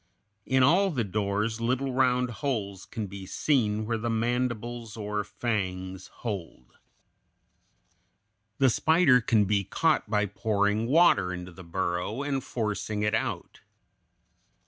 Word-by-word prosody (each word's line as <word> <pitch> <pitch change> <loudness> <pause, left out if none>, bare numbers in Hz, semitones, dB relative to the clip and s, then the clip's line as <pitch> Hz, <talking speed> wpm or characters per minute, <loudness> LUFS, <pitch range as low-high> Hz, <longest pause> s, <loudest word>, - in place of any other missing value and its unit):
In 130 0 +3
all 180 +8 +4
the 130 -9 -1
doors 105 +2 -1
little 130 +3 0
round 125 -1 +2
holes 105 -9 -3
can 110 -3 -4
be 100 -1 -8
seen 110 -2 +1
where 115 0 -1
the 115 +1 -2
mandibles 120 0 -2
or 105 -1 -2
fangs 95 -4 -3
hold. 90 - -7 1.8
The 135 -2 +4
spider 155 -3 +4
can 110 -3 +3
be 100 0 +1
caught 155 - +1
by 105 -1 +2
pouring 105 +1 0
water 140 - +4
into 90 0 -6
the 95 +1 -12
burrow 90 +7 -2
and 135 -2 -2
forcing 105 -2 -2
it 105 +1 +1
out. - - -3
110 Hz, 125 wpm, -28 LUFS, 100-125 Hz, 1.8 s, all